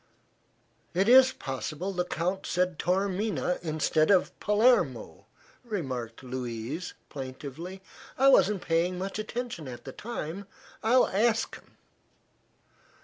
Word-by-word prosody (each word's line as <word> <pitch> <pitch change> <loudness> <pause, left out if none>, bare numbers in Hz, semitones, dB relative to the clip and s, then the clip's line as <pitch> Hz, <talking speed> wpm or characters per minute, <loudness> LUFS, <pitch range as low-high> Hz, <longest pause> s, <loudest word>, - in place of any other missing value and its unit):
"It 190 +3 +2
is 260 +2 +8
possible 150 - -4
the 180 -1 0
Count 180 +3 -2
said 180 -2 0
Taormina, 190 +1 0
instead 155 -1 +1
of 190 -3 +4
Palermo," 175 - +2 0.4
remarked 130 - -4
Louise, 125 +5 -5
plaintively. 145 +7 -7 0.3
"I 270 - +5
wasn't 195 -6 +4
paying 170 +2 +1
much 195 +3 -4
attention 220 - -4
at 125 -2 -8
the 135 - -6
time. 200 - -6 0.3
I'll 245 +3 +5
ask 225 +3 +1
him." - - -14
180 Hz, 110 wpm, -28 LUFS, 140-205 Hz, 0.4 s, is